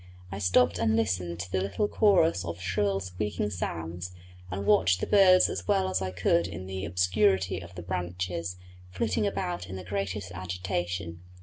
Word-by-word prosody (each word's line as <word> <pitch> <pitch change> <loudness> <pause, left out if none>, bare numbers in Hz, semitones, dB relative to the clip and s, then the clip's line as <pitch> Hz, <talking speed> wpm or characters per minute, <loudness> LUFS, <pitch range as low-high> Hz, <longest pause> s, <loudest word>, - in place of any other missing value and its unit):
I 95 - -5
stopped 105 +6 +3
and 110 -1 +2
listened 90 -6 -1
to 100 -2 -7
the 95 - +1
little 100 - 0
chorus 180 - +3
of 85 0 -5
shrill 95 +2 0
squeaking 105 +3 -3
sounds, 85 0 -5 0.3
and 100 +2 -4
watched 90 -3 +4
the - - -1
birds 185 -3 +6
as 90 -1 -5
well 95 -1 +2
as 95 0 0
I 95 - -1
could 90 -2 +1
in 95 +1 -7
the 95 0 -4
obscurity 95 +1 +2
of 85 -1 -11
the 90 - -7
branches, 90 -1 -3 0.3
flitting 105 +3 0
about 90 -2 -3
in 95 - -7
the 95 - -6
greatest 100 0 -3
agitation. 90 -1 -4
95 Hz, 175 wpm, -28 LUFS, 90-100 Hz, 0.3 s, birds